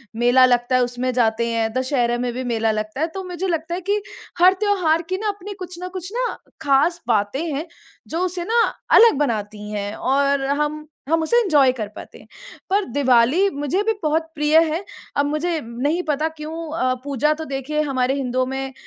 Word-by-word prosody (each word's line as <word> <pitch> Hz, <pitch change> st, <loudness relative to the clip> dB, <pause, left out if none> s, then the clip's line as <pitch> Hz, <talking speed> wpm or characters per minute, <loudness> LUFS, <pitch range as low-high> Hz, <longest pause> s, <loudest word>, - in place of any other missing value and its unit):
मेला 245 Hz, +2 st, +5 dB
लगता 245 Hz, 0 st, +2 dB
है 255 Hz, -, +4 dB
उसमें 245 Hz, +1 st, -2 dB
जाते 230 Hz, -1 st, +1 dB
हैं, 225 Hz, -1 st, 0 dB
दशहरा 255 Hz, -2 st, 0 dB
में 245 Hz, 0 st, -2 dB
भी 255 Hz, +1 st, -4 dB
मेला 225 Hz, -2 st, 0 dB
लगता 215 Hz, +6 st, -4 dB
है। 325 Hz, -, +2 dB
तो 385 Hz, -1 st, -5 dB
मुझे 365 Hz, +1 st, -4 dB
लगता 335 Hz, 0 st, -2 dB
है 370 Hz, -, -5 dB
कि 415 Hz, 0 st, +2 dB, 0.4 s
हर 365 Hz, +2 st, +7 dB
त्यौहार 345 Hz, -6 st, +2 dB
की 375 Hz, -, 0 dB
ना 425 Hz, +1 st, -3 dB
अपनी 410 Hz, 0 st, -4 dB
कुछ 360 Hz, -1 st, -7 dB
ना 365 Hz, -, -5 dB
कुछ 365 Hz, +2 st, -7 dB
ना -, -, +1 dB, 0.3 s
ख़ास 325 Hz, +5 st, +2 dB
बातें 220 Hz, +6 st, +1 dB
हैं 300 Hz, +5 st, -3 dB, 0.4 s
जो 330 Hz, -, -3 dB
उसे 355 Hz, -1 st, -3 dB
ना 465 Hz, +2 st, +3 dB, 0.4 s
अलग 460 Hz, -11 st, +7 dB
बनाती 210 Hz, -5 st, -2 dB
हैं 205 Hz, 0 st, -3 dB
और 275 Hz, 0 st, +1 dB
हम 300 Hz, +2 st, -1 dB, 0.2 s
हम 325 Hz, 0 st, +2 dB
उसे 475 Hz, +9 st, +3 dB
एन्जॉय 295 Hz, -, +4 dB
कर 220 Hz, -5 st, -5 dB
पाते -, -, -10 dB
हैं। -, -, -17 dB, 0.4 s
पर 400 Hz, +1 st, +2 dB
दिवाली 275 Hz, +8 st, +3 dB
मुझे 290 Hz, +7 st, 0 dB
भी 445 Hz, +1 st, +1 dB
बहुत 315 Hz, +2 st, +1 dB
प्रिय 300 Hz, +1 st, +3 dB, 0.2 s
है। 355 Hz, +5 st, -2 dB, 0.3 s
अब 285 Hz, -, +3 dB
मुझे 315 Hz, +3 st, -1 dB
नहीं 275 Hz, +9 st, -1 dB
पता 305 Hz, +1 st, 0 dB
क्यों 305 Hz, +1 st, -6 dB, 0.2 s
अ, 255 Hz, -3 st, +1 dB
पूजा 285 Hz, +2 st, +1 dB
तो 320 Hz, 0 st, -6 dB
देखिए 280 Hz, +2 st, -2 dB
हमारे 265 Hz, -3 st, 0 dB
हिन्दुओं 255 Hz, -1 st, -1 dB
में 265 Hz, 0 st, -4 dB
285 Hz, 195 wpm, -21 LUFS, 250-340 Hz, 0.4 s, हर